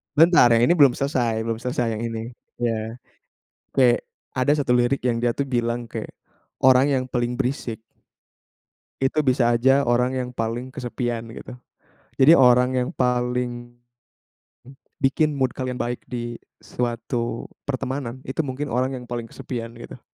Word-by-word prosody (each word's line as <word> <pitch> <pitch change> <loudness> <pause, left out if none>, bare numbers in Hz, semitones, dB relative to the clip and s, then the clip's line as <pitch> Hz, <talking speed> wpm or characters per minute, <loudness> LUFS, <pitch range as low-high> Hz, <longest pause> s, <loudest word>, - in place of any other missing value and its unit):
Bentar 165 -4 +7
yang 115 - +3
ini 170 - +5
belum 135 -4 +6
selesai 120 -5 0
belum 115 0 -3
selesai 125 -1 -1
yang - - -4
ini, 115 +1 -5 0.3
iya. 115 -1 -1 0.8
Kayak, 125 -2 +3 0.3
ada 130 +3 +3
satu 140 -4 +1
lirik 120 +3 +1
yang 120 -2 0
dia 120 0 +1
tuh 140 -1 -2
bilang 120 -1 -1
kayak 110 -2 -6 0.5
"Orang 130 +1 +6
yang 130 -1 -1
paling 120 0 -1
berisik 125 -3 -3 1.2
itu 145 +3 +1
bisa 125 -2 +3
aja 135 +3 +4
orang 120 +1 +2
yang 125 -1 -2
paling 120 +2 -3
kesepian," 120 -3 -4
gitu. - - -9 0.7
Jadi 145 +5 +8
orang 125 -1 +5
yang 125 0 0
paling, 125 -1 -1 0.9
m 135 - -13 0.3
bikin 150 +3 +2
mood 130 -1 +2
kalian 130 -1 -3
baik 120 0 -2
di 120 -1 -4 0.2
suatu 120 -1 -3 0.2
pertemanan, 130 -1 -3
itu 135 +5 -3
mungkin 140 +2 -4
orang 130 +2 0
yang - - -10
paling 120 -1 -4
kesepian 115 -1 -6
gitu. - - -10
125 Hz, 150 wpm, -23 LUFS, 120-130 Hz, 1.2 s, Jadi